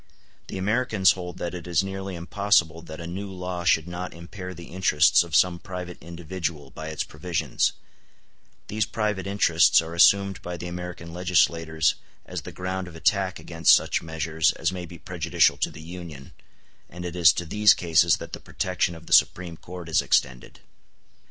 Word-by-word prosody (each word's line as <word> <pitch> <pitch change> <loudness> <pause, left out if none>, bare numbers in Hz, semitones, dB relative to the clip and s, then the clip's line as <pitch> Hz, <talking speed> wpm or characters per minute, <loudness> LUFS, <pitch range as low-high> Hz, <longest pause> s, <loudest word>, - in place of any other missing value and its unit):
The - - -6
Americans 105 0 +2
hold 90 -2 -6
that 85 - -4
it 90 -1 -7
is 85 +1 +2
nearly 95 -1 -5
impossible 85 -2 +1
that 80 -1 -10
a 85 - -7
new 95 +4 -5
law 90 -1 -5
should 80 -2 +2
not 90 0 -6
impair 90 +2 -8
the 85 -1 -11
interests 85 -4 +4
of 85 -3 -5
some 85 +1 +3
private 90 -1 -7
individual 85 -3 -5
by 80 0 -8
its 80 -1 -3
provisions: 80 +2 -1 0.9
these 105 0 -1
private 105 -4 -2
interests 90 -5 +4
are 80 0 -4
assumed 100 +2 +4
by 90 0 -6
the 85 - -7
American 90 -1 -7
legislators 80 -2 +2 0.3
as - - -5
the - - -9
ground 95 0 -4
of 85 - -11
attack 95 +2 +1
against 85 -1 +4
such - - 0
measures 80 0 0
as - - -1
may 90 -1 -6
be 85 +1 -11
prejudicial - - +1
to - - 0
the 80 - -12
Union, 85 -5 -9 0.6
and 90 +1 -8
it 90 0 -5
is 85 -4 +7
to 85 - -4
these 105 +5 +5
cases 85 -1 +3
that - - -10
the - - -5
protection 90 -1 -2
of 80 0 -13
the - - -2
Supreme 85 -1 +3
Court 90 +1 -10
is 80 - +2
extended. 65 -1 -1
85 Hz, 175 wpm, -25 LUFS, 80-95 Hz, 0.9 s, is